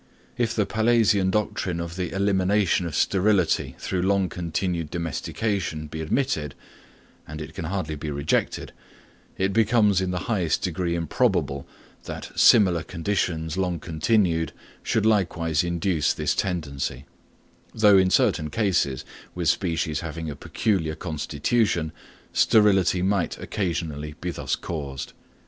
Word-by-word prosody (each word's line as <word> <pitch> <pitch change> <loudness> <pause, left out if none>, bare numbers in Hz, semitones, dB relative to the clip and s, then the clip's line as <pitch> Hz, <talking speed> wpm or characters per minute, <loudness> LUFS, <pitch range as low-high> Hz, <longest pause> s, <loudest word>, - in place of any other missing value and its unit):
If 120 -2 0
the 105 - +2
Pallasian 110 -3 +3
doctrine 100 -4 -1
of 85 0 -5
the 90 -2 -3
elimination 95 -2 +2
of 80 - -5
sterility 95 -1 +2
through 95 -2 -2
long 95 0 +2
continued 85 -1 -2
domestication 85 - -2
be 80 +1 -6
admitted, 80 - -1 0.7
and 75 0 -7
it 80 0 -7
can 80 - -5
hardly 85 -3 -2
be 75 +1 -5
rejected, 70 +1 -1 0.7
it 95 +1 0
becomes 105 -3 +3
in 95 - -1
the 90 0 -2
highest 90 -8 0
degree 85 -1 -1
improbable 85 - 0 0.4
that - - -7
similar 95 -7 +6
conditions 80 -2 -2
long 90 -3 -1
continued 80 +1 +1 0.3
should 110 -2 0
likewise 85 -6 +2
induce 85 -2 +1
this - - 0
tendency; 70 -8 -3 0.7
though 105 -3 +5
in 95 0 +3
certain 75 -3 +2
cases, 75 - 0 0.3
with 85 -3 +1
species 80 -4 0
having 80 -1 -5
a - - -7
peculiar 80 -1 -1
constitution, 80 +3 -1 0.4
sterility 95 -4 +4
might 95 -2 0
occasionally 80 -6 -3
be 90 - -3
thus - - -2
caused. 70 -5 -6
90 Hz, 125 wpm, -25 LUFS, 80-100 Hz, 0.7 s, similar